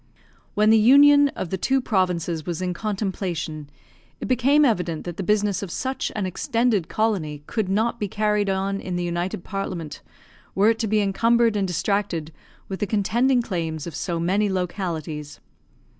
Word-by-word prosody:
When 215 0 +4
the 225 - +6
union 285 +5 +7
of 170 - -5
the 190 - -2
two 270 +6 +2
provinces 180 -8 -1
was 170 0 -4
in 180 -1 -2
contemplation, 180 -7 -3 0.5
it - - -5
became 270 +4 +4
evident 180 - 0
that 175 0 -6
the - - -3
business 205 0 +1
of 200 - -5
such 260 +9 -3
an 210 -3 -1
extended 215 0 0
colony 170 -10 -1
could 215 0 -2
not 225 +4 0
be 205 - -1
carried 210 0 0
on 195 +1 -1
in 180 - -4
the 175 - -1
United 175 +1 -3
Parliament, 180 -7 -5 0.5
were 205 +3 +5
it 225 - -3
to 225 - 0
be 215 0 +2
encumbered 230 +3 +2
and 200 -2 0
distracted 180 -3 -1 0.4
with 190 - -5
the 205 - -1
contending 240 +5 +2
claims 165 -7 -3
of 170 - -7
so 170 +1 -2
many 195 +5 +1
localities. 165 -5 -4
195 Hz, 170 wpm, -23 LUFS, 175-220 Hz, 0.5 s, union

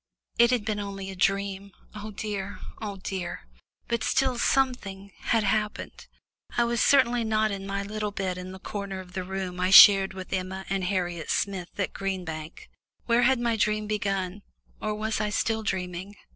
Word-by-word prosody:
It 235 0 +7
had 240 -4 +1
been 215 -2 -1
only 195 -1 -5
a - - -8
dream 195 +1 -1 0.2
oh 215 0 -7
dear, 200 -1 -4 0.2
oh 205 -2 -4
dear! 185 -3 -4 0.5
But 235 -1 -1
still, 260 -3 +1
something 205 -8 0
had 225 -2 +1
happened 210 +1 -2 0.5
I 240 - +5
was 235 -1 0
certainly 245 -4 +4
not 215 -1 +1
in 195 0 -5
my 200 0 -2
little 210 +1 -3
bed 195 -2 -2
in 180 +1 -7
the 190 - -8
corner 195 0 -5
of 180 -1 -11
the 185 -1 -3
room 185 -1 -4
I 180 0 +1
shared 195 0 +9
with 185 0 -7
Emma 190 0 -3
and 195 -2 0
Harriet 175 -3 -2
Smith 190 -2 -2
at 200 - -1
Green 190 -2 -3
Bank. 155 -1 -7 0.4
When 235 0 +3
had 255 +1 +4
my 235 -1 +1
dream 215 -1 +1
begun, 195 -2 -2 0.4
or 215 0 -1
was 215 0 -1
I 210 - 0
still 220 +1 0
dreaming? 185 -1 -3
200 Hz, 180 wpm, -27 LUFS, 190-215 Hz, 0.5 s, shared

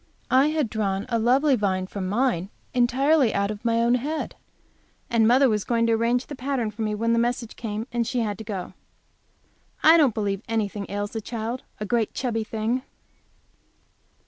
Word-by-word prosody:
I 265 +3 +5
had 305 -4 0
drawn 205 -2 -2
a 230 -1 +1
lovely 265 +5 +3
vine 190 -4 0
for 195 +1 -6
mine 200 -1 0 0.2
entirely 260 +2 +3
out 200 +1 +1
of 210 0 -8
my 230 -1 +2
own 235 +1 +3
head, 295 +6 -2 0.8
and 225 -2 +4
mother 260 +3 +5
was 210 -4 0
going 230 -1 +1
to 230 - +2
arrange 235 +3 +1
the - - -8
pattern 255 -4 -2
for 220 +2 -8
me 215 -1 -1
when 230 +2 +1
that 230 - +3
message 240 -1 -1
came, 220 -1 -4
and 235 -1 -1
she 250 -1 0
had 210 -2 -2
to - - -6
go. 195 -4 -5 1.1
I 320 +2 +8
don't 280 -9 +4
believe 200 -2 -1
anything 210 -3 -2
ails 205 +1 -3
the 225 - -4
child! 230 +3 -4 0.2
a 210 - -3
great 230 0 0
chubby 230 -4 -1
thing! 220 +3 -2
230 Hz, 185 wpm, -25 LUFS, 210-250 Hz, 1.1 s, I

